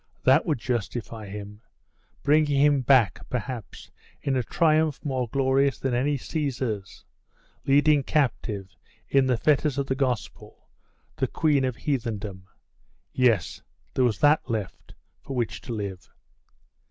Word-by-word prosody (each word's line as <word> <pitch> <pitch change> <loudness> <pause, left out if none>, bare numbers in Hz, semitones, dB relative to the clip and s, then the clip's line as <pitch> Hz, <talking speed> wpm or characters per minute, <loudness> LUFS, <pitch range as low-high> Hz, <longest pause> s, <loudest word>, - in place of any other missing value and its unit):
That 135 +7 +4
would 155 - +1
justify 115 -2 -4
him 105 +1 -8 0.6
bring 150 +1 +4
him 145 -1 +3
back, 120 -9 +4
perhaps, 120 -2 -6 0.3
in 135 - -1
a 130 - +2
triumph 155 +2 +2
more 130 -4 -1
glorious 135 +2 +2
than 135 -2 -2
any 140 +4 +1
Caesar's, 125 - -4 0.6
leading 145 +1 +5
captive, 110 -9 -1 0.3
in 135 -1 +3
the 125 -2 +2
fetters 145 +1 +2
of 140 - 0
the 135 - -1
Gospel, 130 -5 -4 0.5
the - - 0
Queen 150 -4 +1
of 130 -2 -1
Heathendom. 110 - -3 0.7
Yes, 115 - +1 0.3
there 130 - +2
was 115 -5 +2
that 145 -3 +4
left, 110 -5 -5 0.3
for 135 - -7
which 120 -3 -2
to 125 - -8
live. 100 -4 -5
130 Hz, 130 wpm, -26 LUFS, 110-140 Hz, 0.7 s, leading